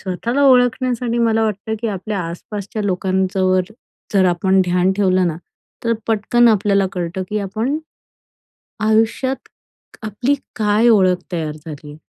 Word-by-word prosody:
स्वतःला 235 +9 -2
ओळखण्यासाठी 245 -1 +2
मला 225 -1 +2
वाटतं 215 +1 -3
की 230 - -2
आपल्या 200 0 -4
आसपासच्या 205 +4 -6
लोकांच्यावर 185 -1 +1 0.5
जर 190 -1 +4
आपण 190 +2 +2
ध्यान 180 +1 +2
ठेवलं 185 -2 +2
ना, 160 -2 -2 0.5
तर 230 - +2
पटकन 230 +2 +3
आपल्याला 200 -2 +2
कळतं, 180 +1 -3
की 210 - 0
आपण 220 +8 -2 1.1
आयुष्यात 230 +4 +1 0.5
आपली 230 +6 0 0.2
काय 215 +1 +3
ओळख 185 -5 +4
तयार 160 -3 -2
झाली 150 -1 -8
आहे. 150 - -12
205 Hz, 130 wpm, -19 LUFS, 185-230 Hz, 1.1 s, जर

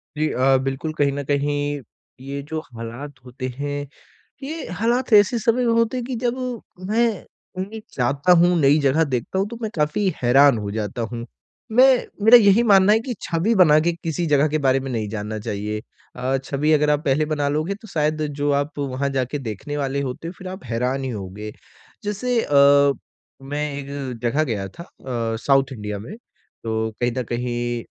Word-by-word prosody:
जी 155 +1 +1
अ, 135 +1 +3
बिल्कुल 135 +4 -3
कहीं 140 -1 +3
न 140 0 -3
कहीं 145 +1 -1 0.4
ये 140 +1 -4
जो 160 - -2
हालात 120 +5 -7
होते 130 +1 -6
हैं, 145 0 -3 0.6
ये 315 +4 -5
हालात 240 +3 +1
ऐसे 205 +3 +6
समय 230 +3 +1
होते 230 +1 +2
हैं 250 - -3
कि 255 0 -4
जब 240 0 +1 0.5
मैं 230 +2 +3 0.5
कहीं 200 +4 -5 0.2
जाता 140 +7 +2
हूँ, 175 +1 +4
नई 145 0 +5
जगह 145 +3 +3
देखता 135 +5 -2
हूँ 195 - 0
तो 235 - -7
मैं 220 - -2
काफ़ी 150 +6 0
हैरान 135 +1 +5
हो 105 -1 -4
जाता 105 +2 -3
हूँ। 120 -1 -5 0.5
मैं 250 +4 +7 0.4
मेरा 235 +2 +10
यही 205 0 +5
मानना 200 -2 +6
है 220 - +3
कि 245 +2 -4
छवि 170 +7 0
बना 155 -6 +6
के 170 +2 +1
किसी 165 +1 -1
जगह 145 0 +3
के 155 +1 0
बारे 135 -2 +3
में 135 0 -5
नहीं 110 -3 -2
जानना 110 0 -4
चाहिए 105 +1 -4 0.3
अ, 130 +2 0
छवि 145 +3 0
अगर 150 0 +3
आप 150 0 +1
पहले 145 +2 +2
बना 150 -2 -1
लोगे 155 +6 -1
तो 220 - -12
शायद 155 -4 -1 0.2
जो 145 0 +1
आप 145 +1 -1
वहाँ 140 0 -1
जाके 135 +1 -2
देखने 130 +4 -5
वाले 140 0 -1
होते 135 +4 -5
हो - - -4
फिर 185 - -9
आप 185 +1 -7
हैरान 125 +3 -1
ही 130 - -2
होंगे। 105 -1 -6 0.5
जैसे 230 +4 -1
अ, 140 -2 +5 0.5
मैं 145 +2 -3
एक 140 -3 -6
जगह 140 +6 +2
गया 105 -9 -3
था 135 - -11
अ, 120 -8 -4
साउथ 135 -1 +3
इंडिया 105 -3 -5
में, 115 - -8 0.5
तो 110 0 -1
कहीं 120 0 +1
न 130 - 0
कहीं 120 -1 -2
145 Hz, 190 wpm, -22 LUFS, 125-170 Hz, 0.6 s, मेरा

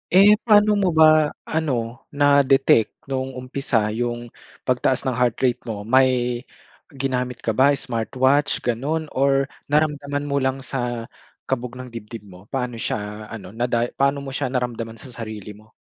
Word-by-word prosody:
Eh, 205 +2 +7
pa'no 210 -2 +5
mo 195 - +2
ba 155 -1 +5
ano, 125 -7 -2 0.2
na-detect 140 -4 +4 0.2
no'ng 130 0 -2
umpisa 125 -4 -1
yung 120 +1 -3 0.3
pagtaas 130 0 +1
ng 130 - 0
heart 125 -1 +1
rate 125 -2 +2
mo? 105 -3 -4
May 130 +4 +5 0.9
ginamit 125 -2 -2
ka 115 - +1
ba, 135 +6 +4
smartwatch, 130 +4 0
gano'n, 145 +7 -2
or 135 0 +2 0.2
naramdaman 145 -1 0
mo 140 -1 0
lang 130 0 -1
sa 120 -3 -4 0.3
kabog 125 -1 -3
ng 130 -1 -9
dibdib 115 -1 -8
mo? 95 0 -15
Paano 125 -3 -3
siya 105 0 -4
ano, 105 -4 -9
naday 120 +1 -1
paano 140 +1 +2
mo 135 - -6
siya 135 0 -2
naramdaman 120 -3 -3
sa 120 +3 -12
sarili 110 -3 -7
mo? 105 +2 -17
125 Hz, 150 wpm, -22 LUFS, 115-140 Hz, 0.9 s, Eh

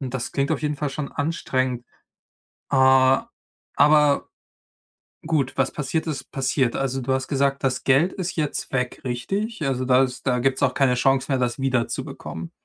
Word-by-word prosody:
Und 130 -2 -5
das 125 -2 -3
klingt 140 0 0
auf - - -2
jeden 150 -1 -1
Fall 150 0 -2
schon 140 +1 -5
anstrengend. 130 -5 -1 0.9
Äh, 140 - +1 1.0
aber 150 -1 +5 1.0
gut, 145 -5 0
was 135 0 +1
passiert, 155 +3 -2
ist 150 -3 -5
passiert. 130 -2 0
Also, 135 -1 -1
du 130 +2 -1
hast 130 0 -1
gesagt, 140 -1 0
das 130 -1 0
Geld 140 +7 +3
ist 180 -2 -4
jetzt 150 -3 -3
weg, 125 -1 -2
richtig? 195 - -3
Also, 130 -1 -1
da 130 0 +4
ist 125 +1 -7
da 125 -1 +2
gibt's 135 +1 0
auch 130 -2 +1
keine 135 -2 +3
Chance 135 +2 +1
mehr, 135 - +2
das 125 0 -1
wiederzubekommen. 120 -9 -3
135 Hz, 170 wpm, -23 LUFS, 130-145 Hz, 1.0 s, aber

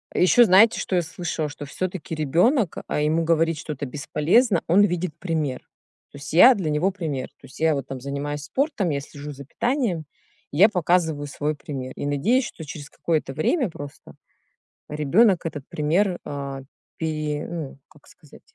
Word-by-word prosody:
Ещё 210 +7 +6
знаете, 215 +3 +6
что 185 - -2
я 175 - +3
слышала? 160 -2 -4
Что 145 0 -8
всё-таки 180 +2 -4
ребенок 175 - +2
А - - -1
ему 155 +2 +1
говорить 165 -1 +1
что-то 150 -3 -5
бесполезно, 165 - +2
он 190 +5 +5
видит 180 -3 -1
пример. 155 -7 -2 0.5
То - - -11
есть 140 +1 -8
я- 245 +10 +8
для 170 -7 -2
него 150 +6 +2
пример. 160 -8 -4
То - - -15
есть - - -14
я 160 -1 +3
вот 140 -2 -3
там 135 -1 -6
занимаюсь 140 +2 -4
спортом, 275 - -1
я 140 -2 -1
слежу 145 +1 -9
за 140 -1 -10
питанием, 230 - -1 0.5
и 145 - -5
я 200 - +8
показываю 165 -5 +1
свой 150 +2 -2
пример 135 -3 -6
и 145 - -4
надеюсь, 225 - +2
что 160 - -10
через 145 -1 -8
какое-то 155 -5 -2
время 225 - +1
просто 145 -3 -11 0.7
ребенок 170 +7 +3
этот 145 -4 -4
пример 175 +5 +1
а, 140 -1 -5 0.4
пере 155 -2 -2
ну, 165 -6 -6
как 150 - -22
сказать, 155 -5 -18
160 Hz, 170 wpm, -24 LUFS, 145-185 Hz, 0.7 s, я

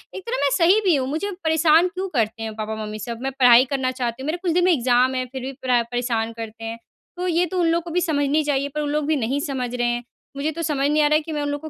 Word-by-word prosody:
एक 385 - -5
तरह - - -1
मैं 280 - +3
सही 365 +5 +5
भी 350 -5 +4
हूँ। 260 -1 -1
मुझे 395 +8 -2
परेशान 320 +2 +4
क्यों 375 +1 -4
करते 225 -5 -1
हैं 220 -1 -4
पापा-मम्मी 215 0 -5
सब, 230 +2 -6
मैं 270 0 -2
पढ़ाई 245 0 +7
करना 265 -2 0
चाहती 250 -1 -4
हूँ, - - -5
मेरे 330 +3 -1
कुछ 360 -3 0
दिन 355 +2 +2
में 365 - +5
एग्ज़ाम 255 -1 +2
हैं, 255 0 -1
फिर 265 - -6
भी 265 +2 -4
परै 250 -2 +3
परेशान 235 -2 -1
करते 225 0 -8
हैं। 225 +1 -5 0.4
तो 360 +1 -2
ये 350 +1 +2
तो 365 +2 -3
उन 340 - +2
लोग 335 0 0
को 345 - -8
भी 360 +2 +1
समझनी 300 -2 +1
चाहिए, 285 -1 0
पर 300 - -1
उन 295 - -2
लोग 300 0 -1
भी 310 0 +1
नहीं 265 +2 -1
समझ 250 -3 -3
रहे 240 -1 0
हैं। 240 0 -1 0.3
मुझे 300 +3 -1
तो 335 - -6
समझ 290 -3 0
नहीं 300 0 +3
आ - - +4
रहा 305 - +3
है 310 - +3
कि 320 - -8
मैं 295 - -2
उन 290 - -2
लोगों 290 +2 -4
280 Hz, 300 wpm, -22 LUFS, 245-320 Hz, 0.4 s, पढ़ाई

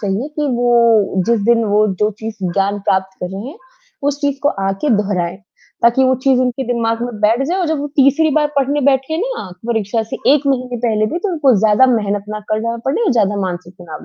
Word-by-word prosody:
चाहिए 205 +7 -2
कि 300 -1 0
वो 235 -5 +3
जिस 235 -2 +2
दिन 230 0 +3
वो, 210 0 +2
जो 210 +2 0
चीज़ 220 0 -5 0.2
ज्ञान 200 +1 0
प्राप्त 190 0 0
कर 180 - -4
रहे 195 +6 -6
है, 305 - -10 0.5
उस 285 0 -1
चीज़ 285 -2 -1
को 285 - +3 0.2
आके 195 +10 -1
दोहराएँ। 190 -4 -1 0.5
ताकि 240 +3 +4
वो 260 0 +3
चीज़ 265 -2 +3
उनके 255 +1 -1
दिमाग 230 -1 -1
में 240 -3 -5
बैठ 225 +4 +2
जाए 355 +5 -1
और 365 - 0
जब 315 -1 -1
वो 290 - -3
तीसरी 285 +3 +4
बार 300 -1 +3
पढ़ने 280 +1 +1
बैठे 270 +3 +1
ना 465 - -4 0.2
परीक्षा 225 -1 -1
से 220 - -6 0.2
1 290 -1 -1
महीने 255 -2 -1
पहले 220 -2 0
भी, 335 - -3
तो 405 - -3
उनको 285 -6 +3
ज़्यादा 220 +4 +4
मेहनत 205 -5 0
ना 215 0 -5
करना 230 +2 -1
पड़े, 370 - +1
ज़्यादा 205 -4 +1
मानसिक 180 -1 -5
तनाव 160 -3 -9
235 Hz, 215 wpm, -17 LUFS, 205-275 Hz, 0.5 s, ताकि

